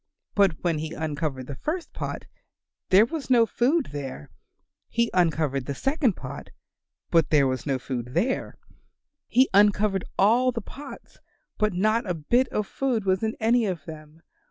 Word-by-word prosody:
But 195 -6 +2
when 165 -3 +1
he 160 +1 -5
uncovered 150 -4 -3
the 140 - -6
first 320 - -4
pot - - -5 0.6
there 195 +4 +7
was 305 +1 -6
no 240 -3 +5
food 265 +7 +1
there; 135 - -7 0.6
he 235 0 0
uncovered 155 -7 +1
the 140 - -3
second 270 - +1
pot, 130 - -8 0.6
but 165 -3 +3
there 145 -3 +4
was 130 0 -2
no 135 -2 +1
food 125 0 -5
there; 240 +10 -1 0.7
he 260 +3 +4
uncovered 205 -1 +3
all 240 +6 +4
the 235 - -4
pots, 275 +6 -11 0.4
but 215 -2 +2
not 215 +3 +1
a 180 - 0
bit 240 - +2
of 210 - -2
food 240 -2 -1
was 185 -1 +1
in 220 0 -1
any 230 0 +3
of 175 -6 -4
them. 155 +1 -11
190 Hz, 160 wpm, -25 LUFS, 150-235 Hz, 0.7 s, there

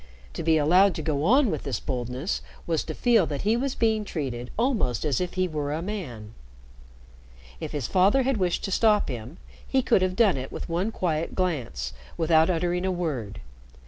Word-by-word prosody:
To - - -4
be 160 0 +3
allowed 180 +5 +4
to 160 - -4
go 145 -2 -1
on 255 +3 +4
with 155 - -2
this 135 -6 -3
boldness 125 - -3 0.2
was 165 -2 0
to - - -5
feel 230 -8 +3
that 145 -2 -4
he 215 +3 +3
was 260 +2 -1
being 220 -2 +1
treated 130 -10 -4
almost 225 - 0
as 145 -1 +1
if 180 0 -3
he 185 0 +1
were 150 -3 -3
a 160 +3 -2
man. 125 - -6 1.3
If - - -5
his 145 -5 -3
father 195 - +3
had 265 -1 +1
wished 180 -3 0
to 195 - -3
stop 210 +1 +3
him, 125 +5 -6 0.3
he 265 -1 +1
could 190 - +3
have 185 0 0
done 200 -7 +4
it 130 0 -5
with - - -6
one 180 +6 -1
quiet 165 -6 -2
glance, 120 - -2 0.2
without 160 0 +4
uttering 175 +1 0
a 190 - 0
word. 150 - -3
170 Hz, 195 wpm, -26 LUFS, 145-200 Hz, 1.3 s, allowed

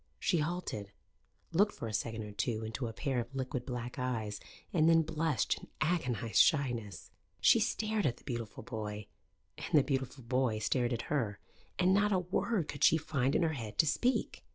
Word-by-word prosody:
She 175 - +1
halted, 150 - -3 0.6
looked 200 +5 +3
for 115 - -5
a 110 - -5
second 110 +1 -2
or 105 - -7
two 110 +2 -2
into 115 +3 -3
a - - -4
pair 130 +3 -1
of 120 +3 -5
liquid 130 -1 -3
black 125 0 -4
eyes 110 -5 -2 0.3
and 160 -1 +4
then 165 -1 +5
blushed 160 -2 0
in - - -13
agonized 130 -9 +2
shyness. 120 - 0 0.3
She 230 - +6
stared 215 -3 0
at 120 - -1
the - - -19
beautiful 115 -4 -5
boy, 105 -2 -5 0.5
and 165 -1 +1
the 145 - +6
beautiful 135 -1 -2
boy 125 -2 +1
stared 120 +3 0
at 115 -1 -2
her, 110 -9 0 0.4
and 185 +1 +4
not 205 +1 +3
a 190 - +4
word 180 0 0
could 140 - -4
she 160 - +7
find 140 -3 0
in - - +3
her 160 -1 +1
head 110 -7 -6
to - - +5
speak. 245 - 0
130 Hz, 190 wpm, -33 LUFS, 115-160 Hz, 0.6 s, she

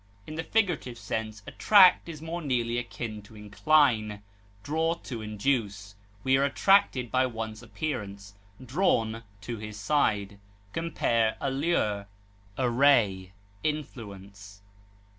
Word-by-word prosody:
In 155 - -8
the 160 +1 -3
figurative 175 - 0
sense, 110 0 -5
attract 190 -4 +5
is 155 -2 -8
more 170 +2 -4
nearly 120 -5 0
akin 115 -2 -6
to 105 +2 -17
incline, 105 -1 +2 0.4
draw 160 +4 0
to 120 -8 -7
induce. 105 -2 -2 0.3
We 130 0 +3
are 135 - +2
attracted 140 - +3
by 130 0 +3
one's 110 -2 -6
appearance, 100 -9 -5 0.3
drawn 115 -7 +1 0.2
to 115 +3 -5
his 105 0 -8
side. 100 -4 0 0.3
Compare 115 -9 0
ALLURE; 135 -8 0 0.5
ARRAY; 120 -7 +3 0.3
INFLUENCE. 100 -9 -6
115 Hz, 110 wpm, -28 LUFS, 105-145 Hz, 0.5 s, attract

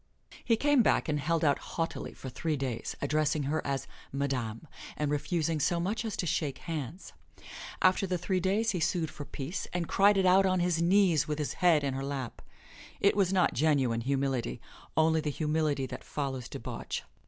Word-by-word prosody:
He 230 - +3
came 290 +1 +4
back - - +2
and 150 -2 0
held 160 +2 0
out 145 -1 +3
haughtily 165 0 -4
for - - -9
three 150 +4 -2
days, 130 -4 -3
addressing 155 +1 +1
her 150 +3 0
as 135 -1 -2 0.3
"Madame," 135 -2 -2 0.3
and 150 -1 -1
refusing 160 +1 0
so 170 +4 +1
much 200 +7 -1
as 220 -3 -4
to - - -1
shake 150 -3 -1
hands. 160 +2 -6 0.7
After 185 +1 +4
the 180 -1 0
three 185 +2 0
days 200 +5 +1
he 185 - -2
sued 160 -1 0
for 145 -2 -8
peace 145 +7 -5
and 175 -2 -1
cried 200 +1 +4
it 190 - +3
out 190 +1 +5
on 185 -1 +2
his 175 -1 +1
knees 170 -4 +4
with 150 -1 -2
his 150 -2 -2
head 170 -5 +5
in 140 -1 -1
her 135 +1 -3
lap. 135 -3 -4 0.6
It 200 - +4
was 195 -3 +2
not 185 -2 +3
genuine 135 -6 +2
humility, 135 - -1 0.4
only 160 0 +4
the 150 - -2
humility 150 -2 0
that - - -7
follows 135 -4 -4
debauch. - - -5
155 Hz, 190 wpm, -30 LUFS, 140-180 Hz, 0.7 s, out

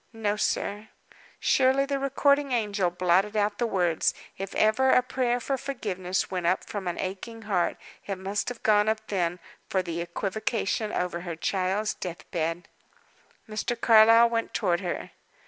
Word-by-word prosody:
"No, 210 -2 -1
sir." 210 0 -2 0.5
Surely 265 +1 +3
the 275 0 -2
recording 280 +1 +2
angel 205 -5 +1
blotted 185 +4 +1
out 205 0 0
the 240 - +1
words! 175 -6 +1 0.2
If 195 0 -6
ever 220 +5 +3
a 250 - +5
prayer 245 0 0
for 270 +2 -2
forgiveness 190 -9 -3
went 180 -2 -1
up 185 +2 +1
from 200 -3 -5
an 175 - -2
aching 225 +5 -5
heart, 195 -5 0 0.3
it 195 -2 -3
must 195 +4 -2
have 245 -2 -9
gone 210 0 +4
up 220 0 -1
then, 175 -3 0 0.3
for 190 -1 +1
the 170 -1 -4
equivocation 210 +4 -2
over 180 -1 -2
her 170 -1 -5
child's 190 +5 -1
death 175 -2 -7
bed! 165 0 -2 0.8
Mr. 220 +2 -3
Carlyle 230 0 +7
went 230 -1 -2
toward 180 -5 +1
her. 180 -2 -4
205 Hz, 160 wpm, -27 LUFS, 180-230 Hz, 0.8 s, Carlyle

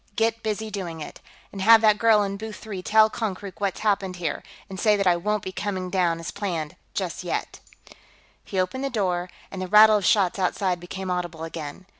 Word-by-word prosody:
Get 225 0 +1
busy 220 0 -3
doing 175 -5 -5
it. 150 - -8 0.3
And 195 - -7
have 225 +3 +7
that 215 -1 +4
girl 220 -2 +5
in 200 0 -3
booth 215 +1 -7
three 200 -4 -7
tell 215 +3 +5
Konkrook 200 -5 -5
what's 200 -2 -1
happened 195 -3 0
here, 175 -2 -3 0.3
and 190 -1 -8
say 210 -2 +4
that 200 - 0
I 180 -1 +5
won't 210 +4 -1
be 190 - -5
coming 185 -1 -4
down, 175 -3 +1
as 165 - -5
planned, 170 -7 -4 0.2
just - - -3
yet." - - -3 0.8
He 190 - -3
opened 185 +9 -1
the 275 - -1
door, 185 -6 -1 0.2
and 190 - -6
the 185 - -3
rattle 215 +2 +7
of 205 - -3
shots 195 -1 +3
outside 185 -1 0
became 185 +2 -5
audible 175 -3 -3
again. 165 +1 -7
195 Hz, 205 wpm, -24 LUFS, 180-215 Hz, 0.8 s, have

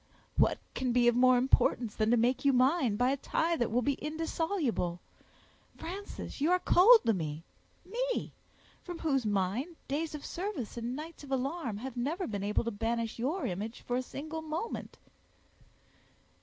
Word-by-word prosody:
"What - - +3 0.2
can 255 -1 -1
be 240 0 +4
of 240 - +5
more 255 0 +6
importance 245 -3 +2
than 215 0 +1
to 240 - +4
make 250 +3 +2
you 280 -1 +4
mine 255 -2 +3
by 245 +4 +2
a 280 - 0
tie 330 +4 0
that 240 - 0
will 245 +3 +1
be 285 - +2
indissoluble! 310 - -1 0.8
Frances, 375 -4 -7
you 305 - +3
are 365 - +5
cold 430 +6 +7
to 225 - +4
me—me—from 350 - -6
whose 270 -8 0
mind, 205 - -1
days 305 +3 -2
of 295 - -8
service 345 - -4
and 240 +1 -3
nights 310 +2 -8
of 275 - -10
alarm 265 -3 -1
have 255 +3 -6
never 305 +10 -1
been 205 -3 -3
able 210 +3 +1
to 235 - -2
banish 230 +2 -2
your 300 +11 -1
image 210 +5 -4
for 245 - -2
a 255 - +1
single 310 +5 -6
moment." 315 +8 -5
260 Hz, 165 wpm, -31 LUFS, 230-325 Hz, 0.8 s, cold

